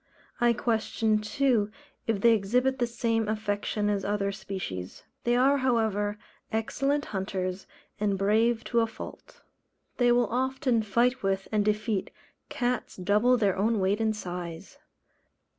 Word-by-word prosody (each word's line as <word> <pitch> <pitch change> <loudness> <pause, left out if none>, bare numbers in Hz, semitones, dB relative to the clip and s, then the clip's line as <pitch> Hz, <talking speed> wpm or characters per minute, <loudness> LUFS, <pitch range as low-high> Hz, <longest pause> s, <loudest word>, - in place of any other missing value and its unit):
I 240 -1 +4
question 220 -1 +1
too 215 0 +1 0.4
if 220 -3 0
they 235 +1 +6
exhibit 250 +6 +1
the 240 - +2
same 230 -2 0
affection 210 -1 -1
as 200 -2 0
other 200 0 0
species. 190 - -6 0.2
They 240 0 +3
are, 275 +3 +4
however, 220 -5 +1 0.3
excellent 275 +6 0
hunters, 190 -1 -3 0.3
and 200 -2 +1
brave 220 +4 +2
to 235 - +5
a 225 - +2
fault. 220 - -10 0.6
They 245 -1 +4
will 240 0 +4
often 255 0 0
fight 240 +5 +1
with, 195 0 -1
and 210 -1 +2
defeat, 210 -1 0 0.4
cats 245 0 -2
double 210 +7 +3
their 205 -5 +2
own 215 +2 +1
weight 195 +3 +1
and 220 -1 +1
size. 180 +4 -7
215 Hz, 140 wpm, -28 LUFS, 200-240 Hz, 0.6 s, they